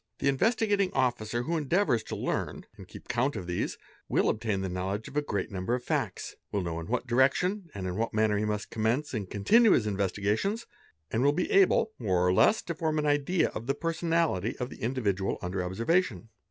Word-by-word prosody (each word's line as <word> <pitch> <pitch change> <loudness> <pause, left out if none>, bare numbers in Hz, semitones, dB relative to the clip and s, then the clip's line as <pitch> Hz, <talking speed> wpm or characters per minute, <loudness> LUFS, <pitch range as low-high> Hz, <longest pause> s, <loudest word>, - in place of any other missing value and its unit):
The 140 - +1
Investigating 205 - +2
Officer 120 -2 0
who 165 +6 -1
endeavours 155 - +2
to - - -5
learn - - -3
and - - -12
keep - - -12
count 130 +4 0
of 90 - -5
these 90 0 -2 0.3
will - - +2
obtain 105 -3 -1
the 95 - -2
know 90 +1 -3
ledge 105 +3 -3
of - - -11
a 150 - +3
great 100 -7 -3
number 95 +5 -1
of 125 - -5
facts, - - -2 0.2
will 100 -2 -1
know 85 -1 -3
in 80 - -7
what 125 +2 -1
direction 155 - +2
and 95 -2 -4
in 90 -1 -3
what 115 +1 -1
manner 110 -1 +2
he 105 - 0
must 105 0 -3
commence 120 +7 0
and 100 -5 -3
continue 220 - +5
his 110 - +2
investigations, 105 - -1 0.5
and 115 - 0
will 145 +1 +4
be 180 +4 -1
able, 195 +3 +4
more 90 -6 +1
or 90 - +3
less, 215 - +4
to 170 - -3
form 160 -1 -1
an 150 - 0
idea 145 +4 +2
of 115 - -7
the 140 - +1
personality 165 - 0
of 125 0 -4
the - - -11
individual 105 -6 -1
under 90 +1 -3
observation. 115 - 0
120 Hz, 210 wpm, -29 LUFS, 100-160 Hz, 0.5 s, continue